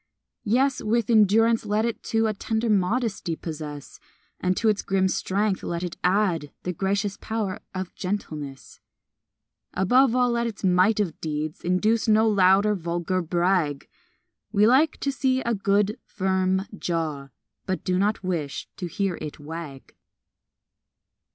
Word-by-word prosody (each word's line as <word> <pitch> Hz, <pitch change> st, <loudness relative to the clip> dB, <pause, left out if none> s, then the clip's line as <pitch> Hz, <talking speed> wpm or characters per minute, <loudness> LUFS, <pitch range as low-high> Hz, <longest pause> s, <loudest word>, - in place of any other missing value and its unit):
Yes, 260 Hz, +5 st, +2 dB
with 235 Hz, +2 st, 0 dB
endurance, 225 Hz, +1 st, +4 dB
let 215 Hz, +1 st, 0 dB
it 235 Hz, -, -3 dB
too 225 Hz, 0 st, 0 dB
A 215 Hz, -, +1 dB
tender 220 Hz, +2 st, -1 dB
modesty 200 Hz, -3 st, 0 dB
possess; 150 Hz, -3 st, -7 dB, 0.4 s
And 185 Hz, 0 st, 0 dB
to 225 Hz, -, +1 dB
its 210 Hz, -2 st, +2 dB
grim 190 Hz, -1 st, +1 dB
strength 195 Hz, +1 st, 0 dB
let 170 Hz, +1 st, -3 dB
it 175 Hz, -2 st, -4 dB
add 180 Hz, -6 st, +1 dB
The 180 Hz, -, -2 dB
gracious 200 Hz, +3 st, -1 dB
power 220 Hz, -2 st, -3 dB, 0.2 s
of 185 Hz, -1 st, -4 dB
gentleness. 155 Hz, -8 st, -5 dB, 1.0 s
Above 245 Hz, +6 st, +4 dB
all, 250 Hz, -1 st, +3 dB
let 235 Hz, 0 st, 0 dB
its 215 Hz, -3 st, -7 dB
might 185 Hz, +3 st, +3 dB
of 185 Hz, -6 st, -2 dB
deeds 155 Hz, 0 st, -3 dB
Induce 215 Hz, +7 st, +1 dB
no 220 Hz, +1 st, +4 dB
loud 195 Hz, -1 st, +4 dB
or 210 Hz, -, +3 dB
vulgar 175 Hz, 0 st, -2 dB
brag 170 Hz, -4 st, 0 dB, 0.6 s
We 205 Hz, +1 st, +4 dB
like 270 Hz, +7 st, +4 dB
to 280 Hz, -, 0 dB
see 260 Hz, -1 st, +1 dB
a 235 Hz, -, -1 dB
good, 200 Hz, 0 st, +1 dB
firm 190 Hz, 0 st, 0 dB
jaw, 160 Hz, -7 st, -3 dB, 0.4 s
But 185 Hz, -1 st, -2 dB
do 185 Hz, -1 st, 0 dB
not 205 Hz, +1 st, 0 dB
wish 165 Hz, -6 st, -3 dB
to 180 Hz, -, -4 dB
hear 190 Hz, 0 st, -2 dB
it 150 Hz, -, -6 dB
wag. 150 Hz, -2 st, -8 dB
195 Hz, 145 wpm, -25 LUFS, 175-220 Hz, 1.0 s, endurance